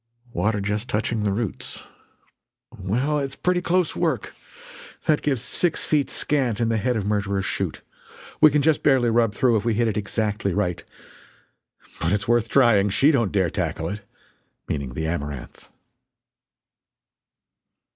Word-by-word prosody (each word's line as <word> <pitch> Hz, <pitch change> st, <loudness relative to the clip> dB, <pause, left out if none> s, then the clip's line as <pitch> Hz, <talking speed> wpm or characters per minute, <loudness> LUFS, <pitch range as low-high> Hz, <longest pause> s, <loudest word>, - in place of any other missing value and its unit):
"Water 105 Hz, -1 st, 0 dB
just 105 Hz, +4 st, -2 dB
touching 110 Hz, +1 st, -1 dB
the 105 Hz, -1 st, +1 dB
roots." 105 Hz, 0 st, -4 dB, 0.9 s
"Well 125 Hz, +11 st, -1 dB
it's 135 Hz, -1 st, -4 dB
pretty 180 Hz, 0 st, 0 dB
close 180 Hz, -1 st, +1 dB
work. -, -, -1 dB, 0.7 s
That 155 Hz, -2 st, +2 dB
gives 135 Hz, -6 st, -1 dB
six 170 Hz, +5 st, 0 dB
feet 150 Hz, -3 st, +1 dB
scant 130 Hz, -7 st, 0 dB
in 115 Hz, -1 st, +1 dB
the 115 Hz, -, +1 dB
head 125 Hz, +4 st, 0 dB
of 105 Hz, -3 st, -2 dB
Murderer's 100 Hz, -2 st, -1 dB
Chute. -, -, -3 dB, 0.6 s
We 155 Hz, -, +9 dB
can 145 Hz, 0 st, +1 dB
just 160 Hz, 0 st, +3 dB
barely 130 Hz, -5 st, +3 dB
rub 115 Hz, -2 st, +2 dB
through 120 Hz, 0 st, +3 dB
if 105 Hz, -, -2 dB
we 115 Hz, -2 st, +1 dB
hit 115 Hz, +1 st, +2 dB
it 110 Hz, -1 st, -1 dB
exactly 105 Hz, -2 st, -1 dB
right. 90 Hz, -1 st, -1 dB, 1.2 s
But 85 Hz, +4 st, 0 dB
it's 105 Hz, 0 st, -1 dB
worth 120 Hz, -1 st, +2 dB
trying. 115 Hz, -7 st, +4 dB
She 135 Hz, +10 st, +4 dB
don't 115 Hz, -9 st, +1 dB
dare 95 Hz, -5 st, +1 dB
tackle -, -, -2 dB
it!" 105 Hz, +1 st, -5 dB, 0.7 s
meaning 70 Hz, -4 st, -4 dB
the 80 Hz, -, -2 dB
Amaranth. 75 Hz, -5 st, -5 dB
110 Hz, 150 wpm, -23 LUFS, 100-135 Hz, 1.2 s, We